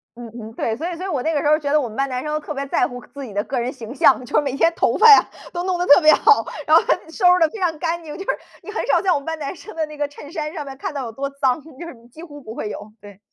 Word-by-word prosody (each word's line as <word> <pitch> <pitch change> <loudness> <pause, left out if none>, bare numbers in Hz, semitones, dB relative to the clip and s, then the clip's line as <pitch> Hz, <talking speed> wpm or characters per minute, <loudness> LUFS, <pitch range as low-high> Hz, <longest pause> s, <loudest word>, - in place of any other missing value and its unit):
嗯 240 -1 -9
嗯， 220 +1 -9
对。 225 -1 -2
所 330 +8 -4
以 345 - -5
所 365 - -6
以 - - -3
我 290 -9 -2
那 320 - 0
个 295 - 0
时 - - -1
候 305 +1 +5
觉 285 -2 -3
得 305 - +4
我 255 - -2
们 220 - -10
班 275 0 -1
男 255 +1 -3
生 300 - -3
都 305 - 0
特 300 - -9
别 280 -1 -3
在 260 - +1
乎 245 0 -8
个 - - -16
自 280 -1 -9
己 230 - -8
的 205 +1 -1
个 260 -2 -3
人 245 +2 -2
形 245 -2 -9
象， 285 -5 +4
就 - - -5
是 - - +5
每 275 -3 -3
天 330 +4 +2
头 - - +1
发 455 - +6
呀 420 - +8 0.3
都 350 0 -3
弄 370 -1 0
得 355 - -1
特 290 +3 +7
别 310 - +7
好， 440 - +4 0.2
然 - - +5
后 - - +7
还 - - +2
得 320 - -15
收 365 +3 -2
拾 360 - +4
得 325 - +5
非 435 - -9
常 340 -4 0
干 335 +1 -2
净， 300 0 -8
就 385 - -6
是 - - -9 0.3
你 415 - -8
很 440 - -3
少 - - +3
在 380 - +1
我 290 - +2
们 280 - -15
班 325 0 -3
男 285 +2 -5
生 430 - -12
的 320 -1 -1
那 305 0 -11
个 290 -1 -2
衬 290 +1 -12
衫 305 -2 -4
上 300 -4 -6
面 270 - -8
看 390 - -4
到 270 - -3
有 230 - -6
多 275 +5 -4
脏， 275 0 0 0.2
就 340 - -8
是 300 - -9
几 315 +7 -13
乎 290 -3 -11
不 220 -3 -9
会 210 - -4
有， 210 +1 -9
对。 205 -1 -14
295 Hz, 390 characters per minute, -21 LUFS, 260-330 Hz, 0.3 s, 呀